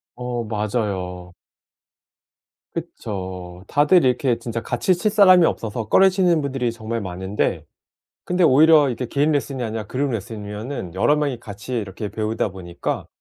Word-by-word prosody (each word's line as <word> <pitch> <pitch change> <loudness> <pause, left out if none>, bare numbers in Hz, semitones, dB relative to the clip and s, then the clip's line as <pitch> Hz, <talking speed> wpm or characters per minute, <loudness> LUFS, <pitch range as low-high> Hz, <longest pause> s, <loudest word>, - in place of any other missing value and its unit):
어 125 -1 -3
맞아요. 100 -5 -3 1.4
그쵸. 90 -2 -6
다들 150 +3 +4
이렇게 125 -1 +1
진짜 115 -1 -4
같이 150 +12 +1
칠 210 +4 0
사람이 185 -5 +7
없어서 110 0 -3
꺼리시는 185 -4 +4
분들이 130 -4 -1
정말 115 0 -4
많은데 95 +1 -2 0.6
근데 180 0 +1
오히려 150 0 +6
이게 125 +1 -3
개인 145 +5 +1
레슨이 140 -3 -1
아니라 110 -2 -4
그룹 135 +4 -1
레슨이면은 105 -1 -5
여러 110 +10 +3
명이 145 -5 -1
같이 110 +3 -7
이렇게 105 0 -5
배우다 110 -1 -2
보니까 90 -2 -5
115 Hz, 325 characters per minute, -22 LUFS, 105-145 Hz, 1.4 s, 사람이